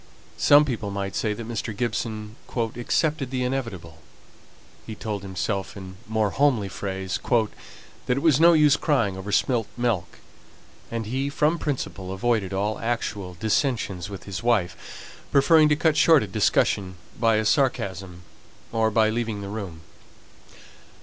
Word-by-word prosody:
Some 145 +1 +6
people 115 -6 -3
might 100 -1 -4
say 105 -2 0
that 115 +1 -7
Mr. 110 -2 -4
Gibson 110 -2 -3 0.2
"accepted 125 +5 0
the 130 -1 -2
inevitable;" 110 -11 -4 0.9
he 110 - -6
told 105 -2 -4
himself 95 +1 -3
in 95 -1 -9
more 110 -2 0
homely 130 -8 +2
phrase 95 0 -4
"that 120 +2 -2
it 140 - -2
was 155 -4 +4
no 170 +1 +7
use 150 -2 +5
crying 115 - +1
over 95 +2 -6
spilt 115 +1 +1
milk:" 120 -8 -1 0.7
and 115 -1 -3
he, 135 +5 -2
from 150 +4 +1
principle, 100 -10 -4
avoided 100 0 0
all 100 +3 -1
actual 105 -5 -3
dissensions 110 - -1
with 100 -3 -8
his 100 -2 -5
wife, 115 -7 -2
preferring 155 +2 +5
to 150 - +4
cut 160 0 +2
short 160 -6 +5
a - - -5
discussion 95 0 +1 0.2
by 115 -1 +3
a 110 0 +1
sarcasm, 95 - 0 0.5
or 110 -1 +2
by 110 0 +3
leaving 110 -2 -2
the 100 - -6
room. 95 -6 -6
110 Hz, 145 wpm, -24 LUFS, 100-125 Hz, 0.9 s, no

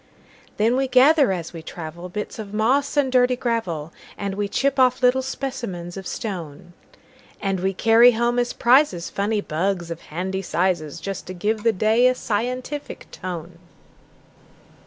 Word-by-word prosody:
Then 230 +4 +2
we 270 0 +1
gather 270 0 +5
as 175 -3 -4
we 165 - -7
travel, 170 +2 -8
Bits 210 +4 -5
of 210 -1 -7
moss 265 +7 +1
and 270 -3 +2
dirty 250 0 +4
gravel, 205 - -2 0.2
And 200 -1 -3
we 205 +1 -2
chip 275 +6 0
off 255 0 +3
little 250 +1 +4
specimens 245 -10 -5
of 190 -1 -7
stone; 175 -4 -6 0.7
And 195 -2 -1
we 190 +1 -1
carry 230 +4 +6
home 240 +2 +1
as 245 0 0
prizesFunny 215 - +2
bugs, 175 +1 -1
of 165 - -6
handy 190 +4 -3
sizes, 170 -4 -1
Just 195 +2 -5
to 185 - -6
give 210 +4 -1
the 230 +1 +3
day 220 +5 +3
a 255 - +2
scientific 250 +6 -4
tone. 175 -1 -7
210 Hz, 155 wpm, -22 LUFS, 180-250 Hz, 0.7 s, carry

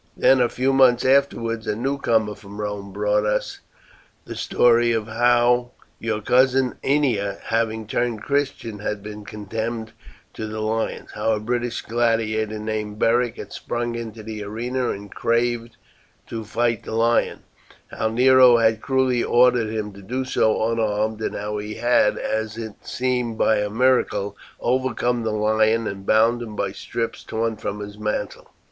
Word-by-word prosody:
Then 130 -1 +5
a 120 - +3
few 130 +2 0
months 130 -2 +5
afterwards 115 -4 +1
a 105 - 0
newcomer 115 -4 0
from 100 0 -12
Rome 105 -1 -4
brought 105 +1 +1
us 105 0 -1 0.7
the - - -7
story 120 -1 +3
of 110 -2 -1
how 120 +2 +2 0.3
your 110 -1 -2
cousin 130 +2 +3
Ennia, 120 -9 +1
having 110 -1 -1
turned 115 0 -2
Christian, 135 -6 -2
had 105 -1 -4
been 105 0 -8
condemned 110 +2 -4 0.4
to 110 - -5
the 110 0 -5
lions; 110 +1 -2
how 110 - 0
a 105 - -1
British 120 +2 -2
gladiator 110 -2 0
named 105 -1 -4
Beric 120 +1 +2
had - - -8
sprung 120 0 -3
into 115 -2 -6
the 110 -1 -6
arena 120 +4 -2
and 100 0 -6
craved 115 0 0 0.5
to 115 -1 -5
fight 115 +1 0
the - - -6
lion; 115 +1 +1 0.5
how 110 - -1
Nero 125 +1 +6
had 110 -1 +2
cruelly 130 -3 +1
ordered 120 -2 +4
him 105 -2 -4
to 100 - -12
do 125 +7 -3
so 110 -2 +1
unarmed; 110 -1 -1
and - - -2
how 105 +1 -3
he 105 +1 -6
had, 120 -2 +3
as 110 0 -2
it 110 -2 -5
seemed 125 -3 -1
by 110 - +3
a 105 0 -1
miracle, 115 -3 +1 0.2
overcome 125 -1 0
the 115 - -1
lion 110 +1 +2
and 95 -1 -6
bound 115 +2 +4
him 110 -3 -7
by - - -1
strips 115 -1 -4
torn 115 0 -2
from 105 -1 -4
his 105 0 -8
mantle. 105 -1 -3
115 Hz, 160 wpm, -22 LUFS, 105-120 Hz, 0.7 s, Nero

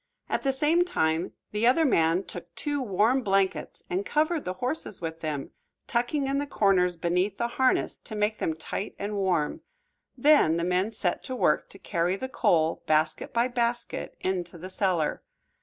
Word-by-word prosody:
At - - 0
the 270 - +1
same 305 +6 +3
time 160 - 0 0.2
the 210 +3 +2
other 315 +6 +4
man 170 - +3
took 175 -2 -9
two 290 -1 -2
warm 230 +3 +2
blankets 195 -3 0
and 185 +3 -1
covered 310 +5 0
the 185 - -2
horses 250 +1 -3
with 165 -1 -5
them, 150 -4 -4 0.3
tucking 245 +4 0
in 275 +1 0
the 290 - -2
corners 185 -7 +2
beneath 180 +4 0
the 235 0 -1
harness 260 +1 +1
to 215 - -8
make 210 +1 0
them 160 - -1
tight 190 +5 -5
and 205 +1 -3
warm. 190 - 0 0.6
Then 290 - +5
the 170 - -1
men 180 +4 +1
set 200 -5 -1
to 260 - -4
work - - +2
to - - -11
carry 175 0 0
the 260 +7 -4
coal, 160 -9 +2
basket 155 0 +1
by 235 +1 +2
basket, 240 -1 -2
into 180 -2 -2
the 185 +3 -8
cellar. 180 -6 0
195 Hz, 175 wpm, -27 LUFS, 175-255 Hz, 0.6 s, Then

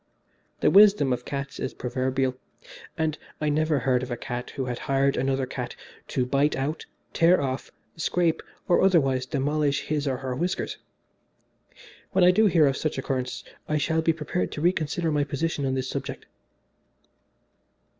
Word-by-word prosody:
The - - +4
wisdom 200 -10 +6
of 125 0 -4
cats 140 0 -5
is 130 - -4
proverbial, 130 +1 -1 0.6
and 160 -1 -1 0.2
I 150 - -2
have 150 - +2
never 155 0 +2
heard 125 -1 +1
of 130 - -5
a 120 - -3
cat 120 +1 -5
who 135 -2 -2
has 125 -1 -4
hired 135 0 +1
another 135 0 0
cat - - -5 0.3
to 125 - 0
bite 140 +4 +2
out, 145 +4 -3 0.3
tear 170 +2 +5
off, 135 -1 -3 0.2
scrape 165 0 +1 0.3
or 175 - +4
otherwise 135 -9 +3
demolish 145 +1 0
his 150 -1 -2
or 130 -2 0
her 130 -1 -4
whiskers. 175 +7 -2 1.3
When 190 - +4
I 180 - +8
do 215 +3 +4
hear 165 -5 +4
of 135 -1 +1
some 155 - 0
such - - -9
occurrence 130 -2 -3 0.3
I 155 - +2
shall 160 +2 +1
be 165 - +3
prepared 160 +3 -2
to 150 - -5
reconsider 170 -1 +1
my 145 -1 +2
position 145 0 -2
on 130 - 0
this 130 0 -2
subject. - - -5
145 Hz, 170 wpm, -26 LUFS, 130-160 Hz, 1.3 s, I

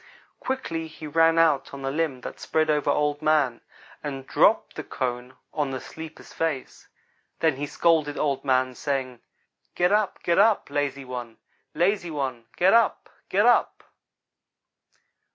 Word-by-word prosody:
Quickly 165 -12 -3
he 155 0 -11
ran 165 +2 +3
out 150 -5 +2
on 135 - -8
the 135 - -1
limb 150 -4 -1
that - - -8
spread 155 -1 +1
over 150 -1 +1
Old 150 0 +1
man, 150 -6 +2 0.4
and 135 -3 -5
dropped - - +3
the - - -5
cone 125 0 -4 0.2
on 150 -3 -1
the 130 -1 -4
sleeper's 160 +3 -10
face. 160 -5 -3 0.5
Then 160 -4 +2
he 145 +1 -3
scolded 155 -2 +2
Old 140 -3 0
man, 130 -1 +2
saying: 130 -2 -3 0.5
'Get 180 +1 +2
up 210 -1 +1
get 170 +2 +2
up 210 -6 +3
lazy 140 -2 -2
one 120 -3 -7 0.4
lazy 175 0 +1
one 130 -6 -4
get 185 +3 +4
up 230 0 +2 0.2
get - - +3
up.' - - +3
145 Hz, 150 wpm, -25 LUFS, 135-165 Hz, 0.5 s, get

